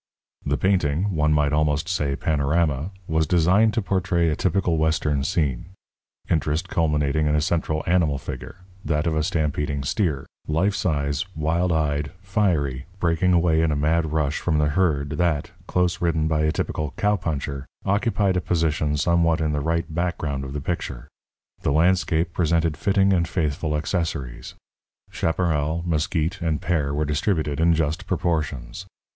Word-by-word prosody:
The 70 Hz, 0 st, 0 dB
painting 95 Hz, 0 st, +1 dB
one 75 Hz, 0 st, +2 dB
might 75 Hz, -1 st, +2 dB
almost 75 Hz, +1 st, +1 dB
say 75 Hz, -7 st, 0 dB
panorama 75 Hz, +1 st, 0 dB, 0.2 s
was 80 Hz, 0 st, +1 dB
designed 95 Hz, +6 st, +3 dB
to 115 Hz, -, 0 dB
portray 90 Hz, -3 st, +1 dB
a 75 Hz, -, 0 dB
typical 90 Hz, -2 st, +1 dB
Western 80 Hz, -3 st, +1 dB
scene, 75 Hz, +3 st, -1 dB, 0.5 s
interest 75 Hz, 0 st, 0 dB
culminating 75 Hz, -2 st, +1 dB
in 75 Hz, -, +2 dB
a -, -, +3 dB
central 80 Hz, 0 st, -1 dB
animal 85 Hz, -5 st, +2 dB
figure, 65 Hz, +8 st, -8 dB, 0.2 s
that 75 Hz, +1 st, 0 dB
of 80 Hz, -2 st, 0 dB
a 80 Hz, -, +2 dB
stampeding 75 Hz, -3 st, -1 dB
steer, 75 Hz, -3 st, -1 dB, 0.2 s
life 85 Hz, +6 st, +1 dB
size, 70 Hz, -3 st, -1 dB
wild 80 Hz, +3 st, 0 dB
eyed, 75 Hz, -2 st, 0 dB
fiery, 85 Hz, -10 st, 0 dB
breaking 85 Hz, +1 st, +2 dB
away 85 Hz, -2 st, +3 dB
in 80 Hz, -1 st, +2 dB
a -, -, +1 dB
mad 80 Hz, +2 st, +1 dB
rush 75 Hz, -2 st, 0 dB
from 80 Hz, -3 st, 0 dB
the 75 Hz, -1 st, +2 dB
herd 75 Hz, -4 st, +1 dB
that, 85 Hz, -5 st, 0 dB, 0.2 s
close 90 Hz, -1 st, 0 dB
ridden 80 Hz, -2 st, +1 dB
by 75 Hz, -1 st, +1 dB
a 75 Hz, -, +2 dB
typical 75 Hz, -1 st, -3 dB
cowpuncher, 80 Hz, -10 st, -1 dB, 0.2 s
occupied 100 Hz, -1 st, +1 dB
a 90 Hz, -, +1 dB
position 80 Hz, -4 st, 0 dB
somewhat 85 Hz, 0 st, +2 dB
in 80 Hz, -1 st, 0 dB
the 75 Hz, -1 st, -1 dB
right 85 Hz, +3 st, 0 dB
background 80 Hz, -5 st, -2 dB
of 65 Hz, 0 st, -6 dB
the 75 Hz, -, -3 dB
picture. 65 Hz, -6 st, -4 dB, 0.5 s
The -, -, 0 dB
landscape 85 Hz, +1 st, +2 dB
presented 80 Hz, -2 st, +1 dB
fitting 100 Hz, +1 st, +2 dB
and 85 Hz, -2 st, +1 dB
faithful 75 Hz, -2 st, -1 dB
accessories. 75 Hz, -5 st, -3 dB, 0.6 s
Chaparral, 80 Hz, -1 st, 0 dB
mesquit, 85 Hz, +2 st, -1 dB
and 80 Hz, -3 st, 0 dB
pear 75 Hz, -6 st, 0 dB
were 75 Hz, +2 st, 0 dB
distributed 75 Hz, 0 st, -1 dB
in 85 Hz, 0 st, +4 dB
just 80 Hz, +3 st, -1 dB
proportions. 80 Hz, -4 st, -2 dB
80 Hz, 155 wpm, -23 LUFS, 75-85 Hz, 0.6 s, in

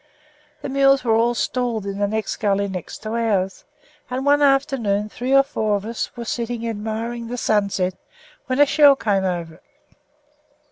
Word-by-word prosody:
The -, -, -4 dB
mules 275 Hz, 0 st, +3 dB
were 230 Hz, -3 st, +2 dB
all 235 Hz, +2 st, +2 dB
stalled 235 Hz, -4 st, -1 dB
in 200 Hz, 0 st, -4 dB
the 205 Hz, -, +1 dB
next 220 Hz, +1 st, -3 dB
gully 200 Hz, -1 st, 0 dB
to 190 Hz, +3 st, -7 dB
ours, 205 Hz, -5 st, -1 dB, 0.4 s
and 255 Hz, +2 st, -3 dB
one 290 Hz, +1 st, +4 dB
afternoon 270 Hz, -8 st, +1 dB
three 250 Hz, +4 st, -4 dB
or 275 Hz, 0 st, +6 dB
four 215 Hz, -6 st, -1 dB
of 200 Hz, 0 st, -4 dB
us 230 Hz, +1 st, -3 dB
were 235 Hz, -, -5 dB
sitting 235 Hz, 0 st, -3 dB
admiring 225 Hz, +2 st, -4 dB
the 245 Hz, +2 st, -5 dB
sunset 200 Hz, -5 st, 0 dB, 0.5 s
when 255 Hz, +1 st, -1 dB
a 290 Hz, -, +8 dB
shell 285 Hz, -1 st, +6 dB
came 200 Hz, -6 st, 0 dB
over. 170 Hz, -3 st, -4 dB
230 Hz, 160 wpm, -21 LUFS, 205-255 Hz, 0.5 s, a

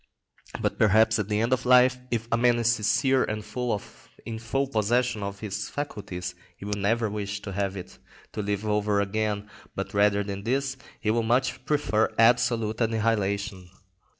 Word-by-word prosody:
But -, -, -2 dB
perhaps 110 Hz, +2 st, +4 dB
at 105 Hz, -1 st, -2 dB
the 105 Hz, 0 st, +1 dB
end 120 Hz, +3 st, +2 dB
of 130 Hz, -, 0 dB
life, 125 Hz, 0 st, +5 dB
if 115 Hz, -1 st, -2 dB
a -, -, +4 dB
man 120 Hz, 0 st, +3 dB
is 120 Hz, 0 st, +3 dB
sincere 130 Hz, +4 st, +2 dB
and 105 Hz, 0 st, -4 dB, 0.8 s
in 110 Hz, -1 st, -5 dB
full 135 Hz, +5 st, -1 dB
possession 120 Hz, -1 st, +1 dB
of 100 Hz, 0 st, -5 dB
his 105 Hz, 0 st, -4 dB
faculties, 95 Hz, -10 st, -5 dB, 0.2 s
he -, -, -9 dB
will 105 Hz, -, -2 dB
never 110 Hz, +3 st, +1 dB
wish 105 Hz, 0 st, -4 dB
to 100 Hz, -, -6 dB
have 100 Hz, 0 st, -2 dB
it 90 Hz, -, -10 dB, 0.3 s
to -, -, -4 dB
live 100 Hz, +1 st, -2 dB
over 105 Hz, -1 st, +1 dB
again, 105 Hz, +1 st, -1 dB, 0.3 s
but -, -, -4 dB
rather 100 Hz, 0 st, +3 dB
than 100 Hz, 0 st, -5 dB
this, 135 Hz, +3 st, 0 dB, 0.2 s
he 110 Hz, -, 0 dB
will 115 Hz, +1 st, +2 dB
much 125 Hz, +3 st, 0 dB
prefer 140 Hz, -7 st, +1 dB
absolute 115 Hz, -1 st, +3 dB
annihilation. 105 Hz, -4 st, 0 dB
110 Hz, 170 wpm, -26 LUFS, 100-120 Hz, 0.8 s, life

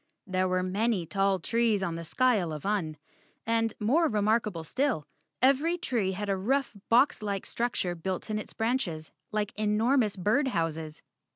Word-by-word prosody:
There 185 Hz, -1 st, 0 dB
were 185 Hz, 0 st, +1 dB
many 195 Hz, 0 st, 0 dB
tall 195 Hz, +2 st, +1 dB
trees 225 Hz, +2 st, +1 dB
on 170 Hz, -, -1 dB
the 165 Hz, 0 st, -5 dB
skyle 210 Hz, -2 st, +2 dB
of 150 Hz, +1 st, -6 dB
Un 185 Hz, -7 st, -1 dB, 0.5 s
and, 225 Hz, 0 st, +1 dB
more 290 Hz, +11 st, +3 dB
remarkable 210 Hz, -, +1 dB
still, 240 Hz, -, -1 dB, 0.4 s
every 285 Hz, +6 st, +4 dB
tree 230 Hz, -, -1 dB
had 205 Hz, +2 st, -4 dB
a 195 Hz, -, +1 dB
rough 260 Hz, +9 st, 0 dB, 0.2 s
boxlike 210 Hz, -5 st, +3 dB
struc¬ 240 Hz, +1 st, -2 dB
ture 175 Hz, -1 st, -1 dB
built 180 Hz, +2 st, -4 dB
in 215 Hz, -, 0 dB
its -, -, -8 dB
branches, 225 Hz, -10 st, -2 dB, 0.2 s
like 210 Hz, -1 st, -1 dB
enormous 215 Hz, +2 st, +2 dB
bird 215 Hz, +10 st, +1 dB
houses. 160 Hz, -6 st, -3 dB
210 Hz, 160 wpm, -29 LUFS, 185-235 Hz, 0.5 s, every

